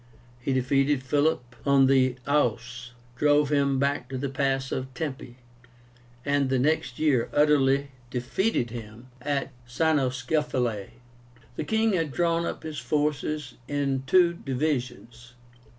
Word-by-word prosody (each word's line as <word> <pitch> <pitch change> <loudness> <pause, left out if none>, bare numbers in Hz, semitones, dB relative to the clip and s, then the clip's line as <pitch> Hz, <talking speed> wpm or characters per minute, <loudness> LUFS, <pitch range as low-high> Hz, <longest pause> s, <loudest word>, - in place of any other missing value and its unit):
He 120 - -2
defeated 135 +1 +1
Philip 130 -3 0
on 140 -1 +5
the 130 -2 +3
Aóus, 125 -3 0 0.3
drove 145 +1 +3
him 140 -2 +2
back 140 -2 0
to 130 - -4
the 140 +1 -2
pass 135 0 -1
of 130 0 -3
Tempe, 130 -4 -5 0.9
and 140 -1 +1
the 130 - +2
next 130 -2 0
year 140 -7 +2
utterly 140 -2 +3 0.2
defeated 125 - -1
him 115 +1 -9
at 140 -1 -2 0.2
CYNOSCEPHALAE. 130 -5 0 0.7
The - - -3
king 220 +4 +1
had 165 -5 0
drawn 170 +2 +1
up - - -5
his 155 -3 -5
forces 150 0 -2
in 140 -2 -1
two 175 +3 +5
divisions. 125 -5 -4
135 Hz, 125 wpm, -26 LUFS, 125-150 Hz, 0.9 s, on